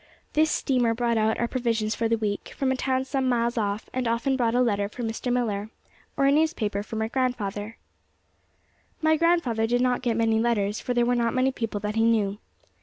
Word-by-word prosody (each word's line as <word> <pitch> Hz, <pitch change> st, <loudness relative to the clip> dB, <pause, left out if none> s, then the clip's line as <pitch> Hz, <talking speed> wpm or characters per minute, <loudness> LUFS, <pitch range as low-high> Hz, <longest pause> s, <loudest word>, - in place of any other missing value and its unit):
This 310 Hz, +1 st, +3 dB
steamer 245 Hz, -6 st, +1 dB
brought 235 Hz, -1 st, +1 dB
our 220 Hz, +2 st, +1 dB
provisions 230 Hz, -4 st, -1 dB
for 230 Hz, -1 st, -1 dB
the 230 Hz, -, +2 dB
week, 210 Hz, -2 st, -3 dB
from 270 Hz, -1 st, +1 dB
a -, -, +1 dB
town 260 Hz, 0 st, 0 dB
some 265 Hz, -1 st, -1 dB
miles 235 Hz, -1 st, +1 dB
off, 210 Hz, -2 st, -2 dB
and 255 Hz, -1 st, -1 dB
often 235 Hz, +4 st, +1 dB
brought 240 Hz, -2 st, +1 dB
a -, -, +3 dB
letter 205 Hz, -4 st, +1 dB
for 245 Hz, +3 st, -7 dB
Mr. 225 Hz, +2 st, -3 dB
Millar, 215 Hz, -4 st, -1 dB, 0.5 s
or 275 Hz, -, +3 dB
a 275 Hz, -, +5 dB
newspaper 280 Hz, -, +1 dB
for 215 Hz, +2 st, -8 dB
my 220 Hz, 0 st, -1 dB
grandfather. 225 Hz, -4 st, -2 dB, 1.3 s
My 315 Hz, 0 st, +4 dB
grandfather 315 Hz, -9 st, +2 dB
did 245 Hz, +1 st, +1 dB
not 250 Hz, 0 st, +1 dB
get 235 Hz, -3 st, 0 dB
many 225 Hz, -1 st, +2 dB
letters, 215 Hz, -3 st, 0 dB
for 245 Hz, -, -3 dB
there 240 Hz, 0 st, +3 dB
were 245 Hz, -, +2 dB
not 235 Hz, -1 st, 0 dB
many 260 Hz, +1 st, +2 dB
people 225 Hz, -5 st, -3 dB
that 210 Hz, +1 st, -3 dB
he 225 Hz, -, +3 dB
knew. 210 Hz, -3 st, +1 dB
235 Hz, 205 wpm, -25 LUFS, 220-255 Hz, 1.3 s, a